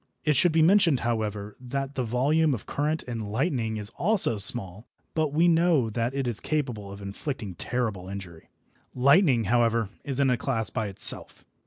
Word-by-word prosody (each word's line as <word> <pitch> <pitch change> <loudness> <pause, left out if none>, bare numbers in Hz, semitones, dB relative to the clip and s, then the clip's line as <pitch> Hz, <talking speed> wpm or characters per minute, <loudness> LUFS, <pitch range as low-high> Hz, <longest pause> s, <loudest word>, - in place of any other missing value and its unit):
It 150 -1 +3
should 175 +5 +4
be 160 0 +3
mentioned, 175 -6 +4
however, 105 -3 -3
that 135 +2 -4
the 130 - -2
volume 140 +6 +1
of 110 - -9
current 155 +2 -2
in 115 -4 -5
lightning 115 - -1
is 105 +1 -3
also 195 - +3
small, 100 0 -1 0.3
but 155 -2 0
we 165 +4 +3
know 165 -8 +3
that 120 +4 -2
it 135 -1 -1
is 120 -3 -1
capable 125 -10 -3
of 100 0 -10
inflicting 100 +1 -5
terrible 105 -2 -3
injury. 95 -5 -9 0.5
Lightning, 140 - +4
however, 115 -2 +1
is 140 -1 -1
in 135 -2 +3
a 125 - +1
class 115 -4 -2
by 110 - -2
itself. 95 - -1
125 Hz, 175 wpm, -26 LUFS, 110-145 Hz, 0.5 s, should